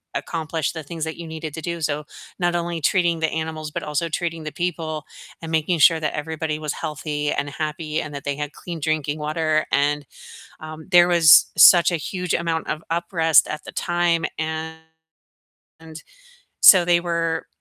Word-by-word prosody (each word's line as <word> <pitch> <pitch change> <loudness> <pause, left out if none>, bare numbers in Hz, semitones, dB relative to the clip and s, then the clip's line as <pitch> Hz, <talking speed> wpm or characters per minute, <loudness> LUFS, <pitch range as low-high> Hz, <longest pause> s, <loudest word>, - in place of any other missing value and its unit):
accomplish 160 -2 -3
the 160 - -7
things 160 +2 -6
that 160 0 -4
you 170 -1 -8
needed 160 -1 -7
to 160 - -6
do. 170 +2 -4
So, 150 0 -2 0.3
not 175 -1 0
only 170 -1 -3
treating 170 +1 +1
the 160 0 0
animals, 160 -1 -4
but - - -5
also 150 +3 -2
treating 165 0 -3
the 155 - -4
people, 160 -3 -4 0.4
and 165 - -6
making 160 +2 +1
sure 160 +1 +6
that 150 - -2
everybody 155 0 -3
was 150 -1 -4
healthy, 150 -1 -4
and 145 - -2
happy, 155 +2 -3
and 145 0 -8
that 140 - -7
they 145 -1 -2
had 145 0 -5
clean 170 -2 -8
drinking 155 -1 -2
water, 155 0 -1
and, 145 0 0 0.5
um, 155 0 -9
there 175 -1 +6
was 170 -4 +6
such 175 -1 +7
a 175 - 0
huge 180 +3 -4
amount 165 -1 -2
of 155 - -3
up 170 +1 -1
rest 160 -4 +4
at 155 - -6
the - - -9
time 175 -1 0
and, 160 0 -7 1.5
so, 185 -3 +8
they 170 0 +3
were 165 -1 -2
160 Hz, 180 wpm, -22 LUFS, 155-170 Hz, 1.5 s, so